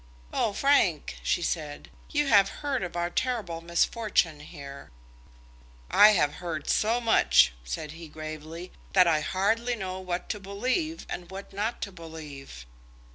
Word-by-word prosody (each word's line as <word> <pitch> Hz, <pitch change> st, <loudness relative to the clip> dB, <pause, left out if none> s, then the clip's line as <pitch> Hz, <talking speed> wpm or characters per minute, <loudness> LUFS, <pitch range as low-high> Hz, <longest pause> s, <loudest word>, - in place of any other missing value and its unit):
"Oh, 220 Hz, -, +1 dB
Frank," 200 Hz, -, +2 dB
she 175 Hz, -, 0 dB
said, 150 Hz, -4 st, -3 dB, 0.2 s
"you 295 Hz, 0 st, +1 dB
have 200 Hz, -7 st, +5 dB, 0.2 s
heard 275 Hz, -5 st, 0 dB
of 180 Hz, -2 st, -4 dB
our 175 Hz, 0 st, -1 dB
terrible 210 Hz, -9 st, -2 dB
misfortune 170 Hz, -1 st, +1 dB
here?" 140 Hz, -2 st, -10 dB, 1.0 s
"I 210 Hz, +1 st, +8 dB
have 150 Hz, -6 st, +2 dB
heard 160 Hz, -4 st, -4 dB
so 225 Hz, +3 st, +2 dB
much," 225 Hz, -, +5 dB
said -, -, -5 dB
he 165 Hz, +1 st, -9 dB
gravely, 155 Hz, +3 st, -8 dB, 0.2 s
"that 185 Hz, -2 st, +7 dB
I 160 Hz, -3 st, +3 dB
hardly 225 Hz, +8 st, 0 dB
know 190 Hz, -3 st, -4 dB
what 180 Hz, -1 st, -4 dB
to 210 Hz, -, -2 dB
believe 255 Hz, -, -2 dB
and 175 Hz, -1 st, -6 dB
what 195 Hz, +1 st, -9 dB
not 215 Hz, +4 st, -2 dB
to 200 Hz, -, -5 dB
believe." 150 Hz, -, -10 dB
180 Hz, 145 wpm, -28 LUFS, 155-215 Hz, 1.0 s, I